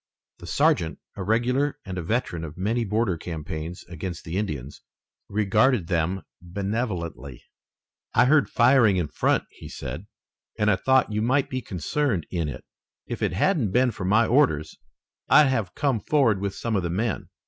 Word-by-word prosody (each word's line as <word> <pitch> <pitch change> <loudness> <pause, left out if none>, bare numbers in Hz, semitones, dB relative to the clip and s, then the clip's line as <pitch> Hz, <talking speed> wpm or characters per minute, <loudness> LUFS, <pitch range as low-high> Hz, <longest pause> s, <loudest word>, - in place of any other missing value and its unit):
The - - -10
sergeant, 80 -1 +2 0.2
a - - -6
regular 125 +8 +1
and 95 -2 -5
a 90 - -3
veteran 85 -2 -2
of 75 0 -8
many 110 +6 0
border 105 -3 0
campaigns 80 0 -6
against 85 +1 -6
the 80 - -6
Indians, 75 -9 -4 0.5
regarded 110 +1 +2
them 90 +2 0 0.2
benevolently. 90 - -4 0.7
"I 120 - +6
heard 150 +2 +4
firing 120 -5 +4
in 85 -5 -1
front," - - +1
he - - -11
said, 90 +7 -7 0.5
"and 105 0 +3
I - - +4
thought 130 +4 +2
you 105 - 0
might 130 +4 +1
be 130 0 -2
concerned 100 - -1
in 85 -4 -1
it. 65 - -8 0.4
If - - -6
it - - 0
hadn't 130 - +2
been 125 0 +3
for 100 -4 -6
my 110 +5 +4
orders 110 - +2 0.5
I'd 150 -2 +7
have 115 -9 -1
come 135 -6 +1
forward 115 -6 +2
with 100 -1 -2
some 115 -2 -2
of 95 - +2
the 85 - -2
men." 100 0 -2
100 Hz, 170 wpm, -25 LUFS, 85-120 Hz, 0.7 s, I'd